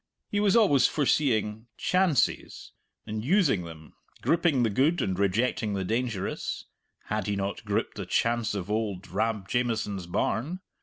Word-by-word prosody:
He 205 - +1
was 205 -1 +3
always 145 - +5
foreseeing 115 -7 +1
"chances" 180 -8 +1 0.3
and 110 0 -4
using 145 - +2
them, 80 -2 -11 0.3
gripping 165 -6 +3
the 115 - +1
good 150 - +2
and 95 - 0
rejecting 105 +1 +1
the 95 -1 -2
dangerous 115 -2 -2 0.4
(had 105 -1 -3
he 100 - 0
not 100 0 -3
gripped - - -1
the - - -5
chance 115 -2 +1
of 100 0 -4
auld 105 -4 -2
Rab 105 +1 -1
Jamieson's 110 -6 -1
barn? 135 - -1
110 Hz, 145 wpm, -27 LUFS, 100-140 Hz, 0.4 s, always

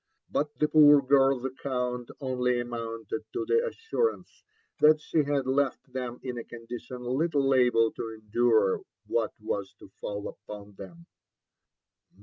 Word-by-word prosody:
But 150 +1 -1
the 150 - +2
poor 150 -2 +7
girl's 135 -1 +3
account 125 -2 -3
only 125 -2 0
amounted 115 -2 -4
to 375 -1 -2
the 460 +4 +3
assurance 455 0 -3 0.4
that 155 0 +6
she 155 - -1
had 140 -2 0
left 135 -1 -1
them 125 -2 -4
in 125 -2 -4
a - - -6
condition 120 +1 -8
little 135 +2 +1
able 120 -3 +4
to 115 - -5
endure 110 -2 +2 0.2
what 110 +1 -1
was 100 -2 -4
to - - -15
fall 100 0 -4
upon 105 0 -10
them. 170 - -12
125 Hz, 135 wpm, -28 LUFS, 115-145 Hz, 0.4 s, poor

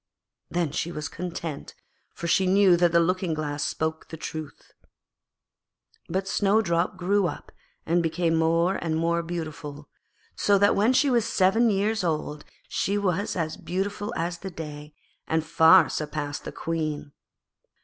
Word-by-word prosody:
Then 170 -4 -1
she 170 +3 -2
was 150 -3 -4
content, 170 -4 -6 0.4
for - - -6
she 185 +2 +3
knew 190 -1 +5
that 175 0 +3
the 170 - +5
Looking 180 -1 0
glass 145 -1 -3
spoke 160 +2 -2
the 160 - -8
truth. 155 -2 -8 1.4
But 190 +1 -1
Snowdrop 190 -4 +1
grew 190 +1 +2
up - - -7 0.3
and 170 +2 +2
became 165 0 0
more 165 +3 +2
and 160 -2 -1
more 170 +1 +1
beautiful, 155 -4 -6 0.5
so 200 -1 +3
that 200 +1 +4
when 215 +5 +3
she 270 +1 +3
was 235 -3 +2
seven 225 +2 +3
years 210 +1 0
old 150 -3 -2 0.2
she 200 +1 -1
was 200 0 -1
as 160 -3 -2
beautiful 195 +5 -3
as 170 +1 -2
the 190 - -6
day, 150 -3 -8 0.3
and 160 0 0
far 160 +1 +6
surpassed 150 -1 -4
the - - -5
Queen. 155 -3 -3
170 Hz, 150 wpm, -26 LUFS, 160-190 Hz, 1.4 s, far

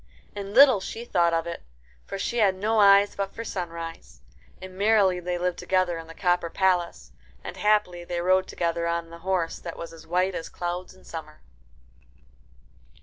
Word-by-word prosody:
And 200 +1 -6
little 260 -4 +8
she 225 +5 -6
thought 170 -6 +2
of 165 0 0
it, 170 0 -6 0.5
for - - -5
she 235 +5 -2
had 195 -3 +4
no 215 +3 0
eyes 200 0 +6
but 195 -1 -4
for 230 - -5
Sunrise. 170 -5 -6 0.4
And 185 0 -10
merrily 200 -2 +3
they 180 0 -3
lived 180 0 -2
together 185 -3 0
in 165 - -10
the 165 - -11
copper 175 -2 +1
palace. 180 -2 0 0.3
And - - -7
happily 210 -5 +1
they 175 0 -4
rode 185 +2 +2
together 170 0 -1
on 170 0 -2
the 170 - -10
horse 180 -2 -1
that 170 - -8
was 170 - -7
as 160 -1 -14
white 180 +3 +1
as 165 - -5
clouds 175 +1 -5
in 185 - -20
summer. 155 -2 -9
180 Hz, 180 wpm, -26 LUFS, 170-195 Hz, 0.5 s, little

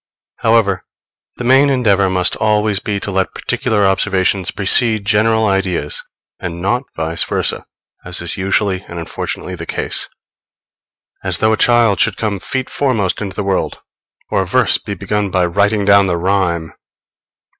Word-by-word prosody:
However, 110 -5 +2 0.5
the - - -5
main 135 +3 +5
endeavor 100 -8 +2
must 90 -1 +1
always 105 -2 +1
be 100 0 -3
to 100 - -3
let 95 0 -1
particular 105 -2 0
observations 95 -1 +1
precede 110 +1 +3
general 110 +2 +2
ideas, 95 -6 -1 0.4
and 85 -1 -5
not 120 +8 -1
vice 80 +1 -1
versa, - - -1 0.4
as 90 0 -5
is 85 - -2
usually 95 0 0
and 85 - -8
unfortunately 85 +2 -5
the 85 -2 -7
case; - - -3 1.1
as - - -1
though 110 0 +2
a - - +3
child 120 -3 +3
should 110 -4 +2
come 105 -3 -2
feet 130 +6 -2
foremost 115 -11 -1
into 95 -2 -5
the 105 - -2
world, 95 -1 -1 0.5
or - - +2
a 95 - -3
verse 130 +8 +3
be 100 - -6
begun 100 +2 -2
by 90 -1 +1
writing 100 +4 +1
down 100 -1 +5
the 85 -2 0
rhyme! 85 -3 0
100 Hz, 155 wpm, -16 LUFS, 95-110 Hz, 1.1 s, main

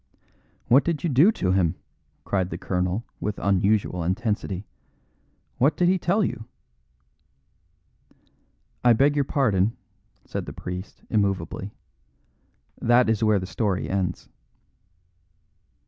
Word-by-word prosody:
"What 135 +4 +6
did 165 -3 -2
you 170 - 0
do 150 - +6
to 90 - 0
him?" 90 -4 +2 0.5
cried 95 -2 -1
the - - -5
colonel, 90 +3 -1 0.2
with 105 -1 -3
unusual 100 -2 +1
intensity. 105 +1 -2 0.9
"What 140 +5 +3
did 175 0 +3
he 185 0 +2
tell 195 +6 +1
you?" 110 -11 -3 2.4
"I 120 -1 +6
beg 140 +5 +3
your 140 -1 +1
pardon," 110 -7 +1 0.5
said - - -5
the - - -6
priest 90 +2 -7
immovably, 100 -2 -1 1.1
"that 120 -1 +4
is 115 0 0
where 110 -1 +4
the 95 - -3
story 95 -1 -2
ends." 95 -2 -2
105 Hz, 115 wpm, -25 LUFS, 95-125 Hz, 2.4 s, What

